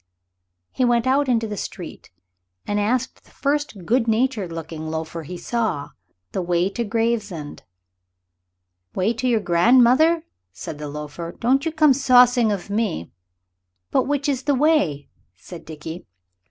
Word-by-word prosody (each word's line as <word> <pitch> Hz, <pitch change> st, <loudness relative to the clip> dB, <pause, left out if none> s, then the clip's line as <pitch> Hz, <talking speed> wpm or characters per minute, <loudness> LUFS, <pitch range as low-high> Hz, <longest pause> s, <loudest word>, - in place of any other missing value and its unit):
He 255 Hz, -, -1 dB
went 240 Hz, -1 st, +2 dB
out 270 Hz, +1 st, +2 dB
into 230 Hz, -2 st, +2 dB
the 210 Hz, -, -4 dB
street, 175 Hz, -3 st, -7 dB, 0.6 s
and 205 Hz, 0 st, -1 dB
asked 245 Hz, +5 st, -1 dB
the -, -, -24 dB
first 285 Hz, -, -2 dB
good 235 Hz, +3 st, +2 dB
natured 225 Hz, -5 st, 0 dB
looking 160 Hz, -1 st, -6 dB
loafer 160 Hz, +1 st, -4 dB
he 175 Hz, +4 st, -8 dB
saw 215 Hz, -7 st, -2 dB, 0.4 s
the 190 Hz, -, -2 dB
way 175 Hz, +1 st, +1 dB
to 235 Hz, -, -2 dB
Gravesend. 215 Hz, -8 st, -2 dB, 1.3 s
"Way 195 Hz, +5 st, +1 dB
to 250 Hz, +3 st, -2 dB
your 230 Hz, -3 st, +2 dB
grandmother," 250 Hz, -, +4 dB, 0.3 s
said 95 Hz, -, -8 dB
the 150 Hz, -1 st, -5 dB
loafer; 150 Hz, +3 st, -7 dB
"don't 270 Hz, +6 st, +2 dB
you -, -, -1 dB
come 305 Hz, -3 st, +5 dB
saucing 250 Hz, -3 st, +5 dB
of 200 Hz, 0 st, -4 dB
me." 205 Hz, -, -2 dB, 0.8 s
"But -, -, +2 dB
which 285 Hz, 0 st, -1 dB
is 270 Hz, -3 st, 0 dB
the 285 Hz, -1 st, +2 dB
way?" 255 Hz, -, +1 dB, 0.2 s
said 175 Hz, -2 st, -11 dB
Dickie. 160 Hz, +2 st, -8 dB
225 Hz, 145 wpm, -22 LUFS, 170-255 Hz, 1.3 s, come